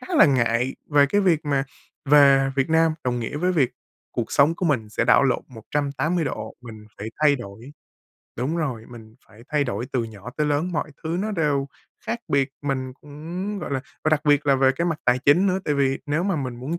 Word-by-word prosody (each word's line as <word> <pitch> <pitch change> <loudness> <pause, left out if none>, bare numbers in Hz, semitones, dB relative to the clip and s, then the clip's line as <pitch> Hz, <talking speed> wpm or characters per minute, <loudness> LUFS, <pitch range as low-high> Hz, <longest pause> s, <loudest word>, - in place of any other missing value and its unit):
khá 370 - -5
là - - +7
ngại 125 -2 +1 0.2
về 145 -1 +5
cái 205 +8 +1
việc 170 -5 +2
mà 140 -2 0 0.4
về 140 -1 +5
Việt 135 +3 +1
Nam 160 0 +3
đồng 120 -1 -1
nghĩa 115 +5 -4
với 180 +4 +1
việc 135 -7 +2 0.4
cuộc 120 -2 -3
sống 145 +4 +4
của 180 - -2
mình 120 -8 0
sẽ 115 - 0
đảo 125 - +5
lộn 130 - +1
180 145 +7 -2
độ, - - -5
mình 110 -3 -11
phải 105 +2 -5
thay 145 -2 +5
đổi 120 +4 -10 0.6
đúng 135 +8 -2
rồi, 130 -9 -3
mình 110 -2 -12
phải 110 +2 -17
thay 150 -2 +1
đổi 120 0 -3
từ 120 -3 0
nhỏ 110 +1 -9
tới 150 -1 +1
lớn, 150 +5 0
mọi 150 -1 -2
thứ 165 +2 -1
nó 215 +1 -2
đều 145 -7 0 0.4
khác 235 - -2
biệt, 140 -1 +2
mình 130 -2 -2
cũng, 170 +8 -6
gọi 155 - -6
là 135 -1 -1 0.2
và - - +3
đặc 155 -1 +3
biệt 145 0 +3
là 140 - +5
về 135 0 +4
cái 170 - 0
mặt 165 -3 -1
tài 125 0 +3
chính 155 +9 +4
nữa. 185 0 +1
Tại 150 - 0
vì 135 -1 +1
nếu 150 +4 0
mà 190 -3 0
mình 130 -4 -4
muốn 150 +8 -4
140 Hz, 225 wpm, -23 LUFS, 125-160 Hz, 0.6 s, là